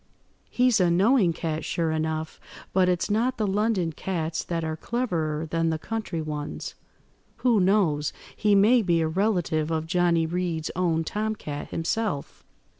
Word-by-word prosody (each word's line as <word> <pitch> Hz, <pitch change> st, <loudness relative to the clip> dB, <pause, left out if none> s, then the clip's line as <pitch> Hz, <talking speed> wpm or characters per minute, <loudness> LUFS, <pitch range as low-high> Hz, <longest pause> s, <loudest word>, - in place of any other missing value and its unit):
He's 250 Hz, -3 st, +3 dB
a 180 Hz, -2 st, +4 dB
knowing 195 Hz, +2 st, +4 dB
cat, 160 Hz, -1 st, -3 dB
sure 165 Hz, -2 st, -1 dB
enough; 160 Hz, 0 st, -2 dB, 0.3 s
but 185 Hz, -1 st, +4 dB
it's 180 Hz, -1 st, 0 dB
not 240 Hz, +4 st, +1 dB
the 215 Hz, -, 0 dB
London 200 Hz, -3 st, +1 dB
cats 160 Hz, -1 st, -3 dB
that 165 Hz, -1 st, -3 dB
are 160 Hz, 0 st, -2 dB
cleverer 160 Hz, -7 st, -2 dB
than 165 Hz, +1 st, 0 dB
the 160 Hz, -, 0 dB
country 200 Hz, -3 st, -4 dB
ones. 150 Hz, -1 st, -5 dB, 0.7 s
Who 235 Hz, -4 st, +5 dB
knows, 180 Hz, -7 st, +2 dB, 0.2 s
he 210 Hz, -1 st, +3 dB
may 225 Hz, +5 st, +5 dB
be 170 Hz, -5 st, +2 dB
a 160 Hz, -, +1 dB
relative 175 Hz, -4 st, 0 dB
of 160 Hz, -1 st, -1 dB
Johnny 170 Hz, -1 st, +2 dB
Reed's 165 Hz, -2 st, -2 dB
own 170 Hz, -3 st, +1 dB
tom–cat 210 Hz, -6 st, -4 dB
himself." 165 Hz, -2 st, -2 dB
170 Hz, 150 wpm, -26 LUFS, 160-205 Hz, 0.7 s, Who